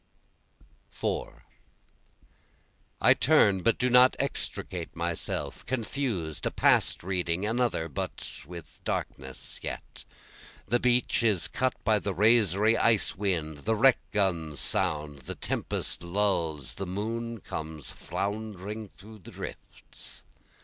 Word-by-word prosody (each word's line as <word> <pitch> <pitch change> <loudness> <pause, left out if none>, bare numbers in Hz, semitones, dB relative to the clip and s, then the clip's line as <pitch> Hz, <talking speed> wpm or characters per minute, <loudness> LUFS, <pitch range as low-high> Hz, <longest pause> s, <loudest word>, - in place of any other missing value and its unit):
4 - - -4 1.6
I - - +7
turn 95 -2 +4
but 115 - +2
do 125 - +1
not 125 +1 +6
extricate 95 -10 -3
myself, 85 -1 -3
Confused, 115 - -2
a - - +2
past - - +3
reading, 90 0 -1
another, 115 -7 0
but 70 - -4 0.2
with 85 -4 -10
darkness 65 -1 -4
yet. - - -6 0.6
The 120 +5 +2
beach 125 -1 +2
is 105 -6 +2
cut 130 -1 0
by 110 -1 +4
the 100 -2 -3
razory 105 0 +4
ice 115 -3 +3
wind, 85 -7 -2
the 110 +9 0
wreck 130 +4 +5
guns 85 -8 0
sound, 75 -1 +2
The 65 - -6
tempest - - 0
lulls, 85 -6 0
the 95 - -5
moon 115 +4 -3
comes 80 -5 -6
floundering 105 +1 -4
through 105 +3 -14
the 90 - -13
drifts. - - -8
100 Hz, 115 wpm, -28 LUFS, 85-115 Hz, 1.6 s, I